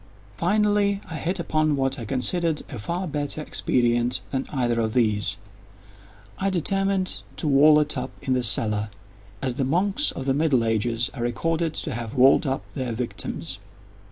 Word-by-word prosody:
Finally 205 - +2
I 160 - -4
hit 180 +4 -2
upon 155 -2 +1
what 135 0 0
I 115 - -5
considered 155 - +1
a 125 - -6
far 175 - -3
better 145 0 -3
expedient 120 -4 +1
than 135 -1 -2
either 120 -4 0
of 110 0 -1
these. 105 -6 +2 1.0
I 195 - +1
determined 195 +1 0 0.2
to 160 - 0
wall 150 +2 +6
it 150 0 0
up - - -3
in 130 - -1
the 130 - +1
cellar—as 105 0 -2
the 135 - -1
monks 190 - +2
of 130 - -6
the 135 - +2
middle 140 -5 +2
ages 115 +2 0
are 135 - -6
recorded 160 +7 -1
to 150 - -3
have 115 +1 -5
walled 135 +3 +5
up 135 0 -2
their 130 -4 -3
victims. 120 +1 -4
135 Hz, 160 wpm, -24 LUFS, 120-165 Hz, 1.0 s, wall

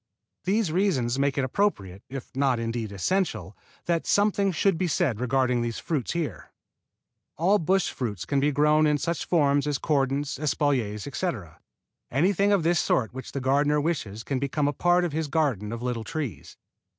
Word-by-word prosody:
These 195 -2 +1
reasons 135 -10 +1
make 140 +1 +1
it 135 - +1
appropriate, 115 - -1
if 135 -1 -8
not 135 -2 +2
indeed 115 -2 -3
essential, 160 - -1 0.3
that 170 -1 0
something 200 -1 +2
should 190 +3 +2
be 180 +2 -1
said 150 - 0
regarding 125 -1 +1
these 120 -1 -3
fruits 150 -7 -2
here. 170 -3 -4 0.9
All 190 +6 +3
bush 185 +3 +1
fruits 105 -7 -4
can 140 - 0
be 145 +2 +2
grown 150 +2 +3
in 150 0 +2
such 170 +2 -2
forms 145 -4 +2
as 145 -2 0
cordons, 140 -1 0
espaliers, 130 -8 0
etc. 130 - -4 0.5
Anything 195 +8 +2
of 200 -5 +3
this 170 +1 +2
sort 115 -2 +1
which 130 0 -8
the 140 - -3
gardener 145 +3 +2
wishes 125 -9 -2
can 130 +3 -2
become 140 +2 0
a 145 - 0
part 175 +4 +2
of 165 - -3
his 160 0 -1
garden 135 - 0
of 115 +1 -5
little 120 -2 -2
trees. 120 - -5
145 Hz, 175 wpm, -26 LUFS, 125-170 Hz, 0.9 s, All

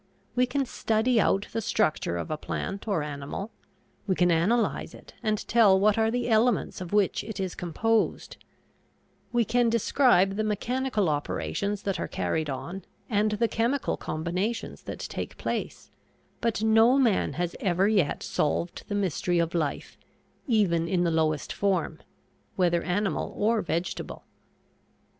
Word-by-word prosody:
We 250 0 +2
can 275 +2 0
study 225 0 +1
out 195 +1 +1
the 225 - -1
structure 155 - 0
of 85 - -4
a - - 0
plant 195 +6 -5
or 190 -8 0
animal; 145 +8 -5 0.6
we 190 - +2
can 180 -1 +3
analyze 200 +9 +1
it - - -15
and 215 0 -1
tell 210 -5 +5
what 210 +1 +4
are 225 0 +2
the 245 +1 -1
elements 230 -3 +2
of 180 - -6
which 205 -2 +2
it 215 -1 -7
is 190 -2 -2
composed; 215 +6 -1 0.9
we 240 -1 +2
can 240 +2 +2
describe 225 -4 +3
the 215 - +1
mechanical 215 0 0
operations 195 +7 -2
that 195 -2 -2
are - - -2
carried 160 -2 -2
on 170 +8 -5 0.3
and 210 0 +2
the 230 +2 +1
chemical 235 +5 0
combinations 180 +8 -3
that - - -6
take - - -5
place, - - -4 0.5
but 230 -2 -1
no 225 +4 +5
man 235 -8 +2
has 175 0 -2
ever 185 +1 +2
yet 195 -9 +1
solved 170 +3 -1
the 205 - -3
mystery 180 -2 0
of 170 -1 +1
life, 155 -5 -3 0.5
even 185 -9 +2
in 175 0 +1
the 170 - +1
lowest 155 -3 0
form 185 -5 0 0.6
whether 175 -2 +2
animal 195 +3 -1
or 220 +1 +2
vegetable. 170 +1 -3
200 Hz, 150 wpm, -27 LUFS, 175-225 Hz, 0.9 s, tell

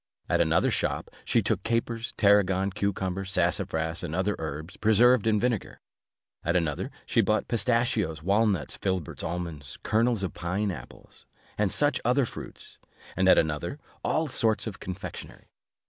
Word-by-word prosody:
At - - +2
another - - +3
shop, - - -1
she - - +2
took - - 0
capers, 115 0 -1
tarragon, 100 -2 +4
cucumbers, 95 -1 -2
sassafras, 80 -2 0
and 85 -2 -3
other 95 +3 +1
herbs, 80 +3 -5
preserved 115 +1 +4
in 105 -1 +3
vinegar: 120 -2 -1 0.6
at 85 +2 0
another, 80 -5 0 0.2
she - - +3
bought 110 0 +1
pistachios, 110 - +1
walnuts, 100 -2 +1
filberts, 95 -5 -2
almonds, 80 -5 -5
kernels 110 -1 +2
of 95 - -2
pine 95 +4 -1
apples, 70 -9 -11 0.3
and 105 -3 +1
such 145 0 +1
other 125 +3 +3
fruits; - - -8 0.4
and 95 +1 +3
at - - +7
another, 80 - 0 0.3
all 160 0 +1
sorts 110 -5 +1
of 110 -4 -6
confectionery. 95 +1 -8
100 Hz, 145 wpm, -27 LUFS, 85-110 Hz, 0.6 s, at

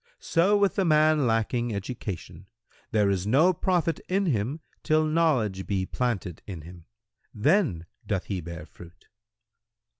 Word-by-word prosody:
So 190 +5 +2
with 200 0 +1
the 195 - +3
man 155 -4 +4
lacking 115 0 0
education; 95 -4 -6 0.4
there 105 -2 +2
is 95 0 -1
no 155 +11 +4
profit 170 -2 0
in 195 +2 +1
him 135 - -1 0.2
till 155 0 +2
knowledge 140 - +1
be 95 -2 0
planted 100 -8 -3
in 90 -6 -6
him; 85 +1 -13 0.5
then 125 - +2 0.2
doth 95 -3 -1
he 95 -3 -3
bear 85 -1 -8
fruit." 85 +1 -15
115 Hz, 140 wpm, -26 LUFS, 95-155 Hz, 0.5 s, man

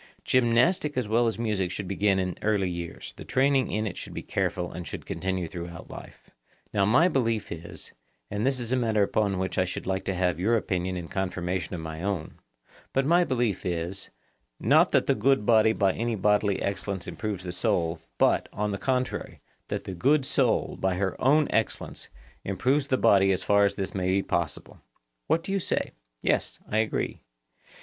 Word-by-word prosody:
Gymnastic 130 +5 +2
as 125 -4 0
well 115 +2 +3
as 110 - -1
music 105 -5 -1
should 95 +1 -5
begin 100 +1 +2
in 90 -2 -1
early 105 -3 +1
years; 85 -1 -6
the - - -8
training 135 -1 +2
in 110 +1 -1
it 95 -4 -4
should - - -8
be - - -5
careful 90 -1 -2
and 85 -1 -7
should - - -7
continue 95 -2 -2
through 85 -2 -6 0.2
life. - - -12 0.4
Now 100 -1 +3
my 130 - +5
belief 115 - 0
is,—and 80 - -8
this 135 0 +1
is 120 -1 -4
a - - +3
matter 110 -4 +2
upon 100 -1 +1
which 95 0 -2
I 90 - +3
should 90 - -5
like 95 0 -1
to 95 - -1
have 90 -2 0
your 115 +6 +3
opinion 90 -3 -2
in 85 -2 -5
confirmation 90 -1 -2
of 85 - -5
my 80 0 -6
own, 95 -4 -3 0.5
but 135 0 +2
my 170 +4 +5
own 175 - 0
belief 120 -7 0
is,—not 85 -8 -1
that - - +3
the - - +3
good 135 -6 +2
body 110 -1 +5
by 100 -4 +2
any 115 0 -1
bodily 105 0 +2
excellence 100 -1 -3
improves 90 +2 -4
the 90 - -4
soul, 85 -5 0 0.2
but, - - +3
on 105 +1 -2
the 100 - -3
contrary, 130 +1 -2 0.3
that - - -3
the 95 - -6
good 135 - +2
soul, - - +1
by 95 -1 +1
her 95 +1 -1
own 150 +4 +5
excellence, 110 - -2 0.3
improves 130 +9 +1
the 130 - +2
body 95 -4 +5
as 95 0 -1
far 100 +2 +4
as 100 - 0
this 95 -2 -3
may 90 -2 -1
be 95 +1 +2
possible. 85 -4 -3 0.5
What 165 - +2
do 195 - -5
you 195 - +1
say? - - -1 0.3
Yes, - - 0
I 110 - 0
agree. 110 -1 -1
100 Hz, 190 wpm, -27 LUFS, 90-115 Hz, 0.5 s, my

